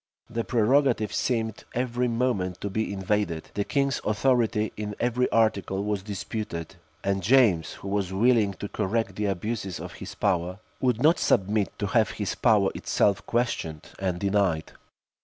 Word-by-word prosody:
The 115 0 -1
prerogative 120 -1 +2
seemed 110 -4 -1
every 125 0 0
moment 115 -7 0
to 100 - -3
be 110 +2 -1
invaded; 95 -4 -1
the 100 - 0
king's 140 +4 0
authority, 110 -1 +1
in 105 -1 -4
every 125 +1 +1
article, 100 -3 +1
was 105 -1 -1
disputed; 100 -4 -5 0.3
and 100 0 0
James, 100 - +4
who - - -9
was 100 -2 -1
willing 110 0 +3
to 100 - -5
correct 100 0 -1
the 105 0 -1
abuses 100 0 -3
of - - -7
his - - -8
power, 90 +1 0 0.2
would 125 -1 +1
not 160 +3 +5
submit 100 0 +1
to 105 - -2
have 110 +2 +2
his 105 -3 -1
power 105 -5 +3
itself 100 -3 +1
questioned 115 -10 -2
and 95 -2 -1
denied. 95 -5 +1
105 Hz, 155 wpm, -26 LUFS, 95-115 Hz, 0.3 s, not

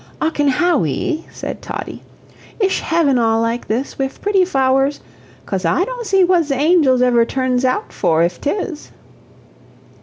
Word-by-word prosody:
"Ocken 300 -3 +1
Hawwy," 305 - 0
said - - -7
Toddie, - - -7 0.6
"ish 390 -3 +1
heaven 305 -6 +1
all 225 -1 +2
like 230 +1 -2
this, 245 +7 -3
wif 270 0 -3
pretty 405 -2 +2
f'owers? 270 -3 +1 0.5
Cos 190 -1 -3
I 170 - +1
don't - - -6
see 390 -1 +3
what 355 -2 +3
ze 280 -2 -1
angels 285 -4 +3
ever 240 -2 +4
turns 255 +1 -1
out 260 +12 -1
for 165 -3 +1
if 175 +1 -2
'tis." 320 0 -3
275 Hz, 150 wpm, -18 LUFS, 245-350 Hz, 0.6 s, ever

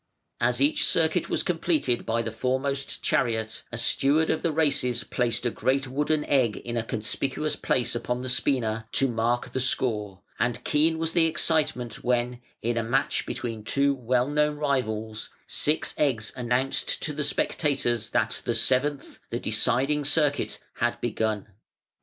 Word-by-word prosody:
Ac 125 +3 +3
each 150 - +2
circuit 165 +1 +3
was - - +1
completed 160 -8 0
by 115 +1 +1
the 110 - -3
foremost 130 +4 -2
chariot, 110 -3 0
a 120 - -4
steward 145 +6 +2
of 160 - -1
the 165 - 0
races 140 -6 +1
placed 120 0 -1
a 120 - +1
great 130 +5 0
wooden 150 +3 0
egg 130 -6 +2
in 120 0 -6
a 115 - +1
conspicuous 135 +7 -2
place 120 -2 0
upon 125 +1 -3
the - - -4
spina 115 -4 0
to 135 - +3
mark 120 0 -1
the - - -2
score; 105 -7 0 0.2
and 120 -1 0
keen 160 +2 +2
was 165 0 0
the 165 -2 +4
excitement 155 -7 0
when, 125 0 0 0.2
in 120 +1 0
a 115 - +1
match 130 +5 0
between 115 -3 -4
two 140 +5 +2
well 125 -1 0
known 150 +1 +1
rivals, 110 -7 -2 0.2
six 150 +2 0
eggs 125 -7 +1
announced 125 +1 0
to 150 - -1
the 150 +1 -2
spectators 135 -6 0
that 110 -1 0
the 120 - 0
seventh, 130 +4 +1
the 120 - -2
deciding 135 +7 +1
circuit, 145 0 +1 0.2
had - - 0
begun. 110 -2 -1
125 Hz, 160 wpm, -26 LUFS, 115-145 Hz, 0.2 s, the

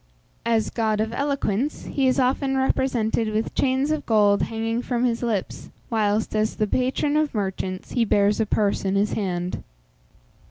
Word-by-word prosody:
As 225 -2 +1
god 220 -2 0
of 220 +1 -1
eloquence, 280 -2 -1
he 270 -2 0
is 260 +2 +2
often 270 +1 +1
represented 235 -4 +1
with 215 +1 -2
chains 265 +2 +1
of 310 -1 -1
gold 205 -2 +4
hanging 225 +1 -2
from 245 -1 -1
his 235 -2 0
lips, 225 -6 -3 0.2
whilst, 215 -1 0
as 215 0 0
the 215 - +1
patron 260 +6 0
of 305 -4 +1
merchants, 190 -2 -3
he 240 - +2
bears 205 -1 +2
a 220 - +1
purse 205 -1 +1
in 195 0 0
his 205 +1 +1
hand. 180 -3 -2
225 Hz, 165 wpm, -24 LUFS, 210-260 Hz, 0.2 s, gold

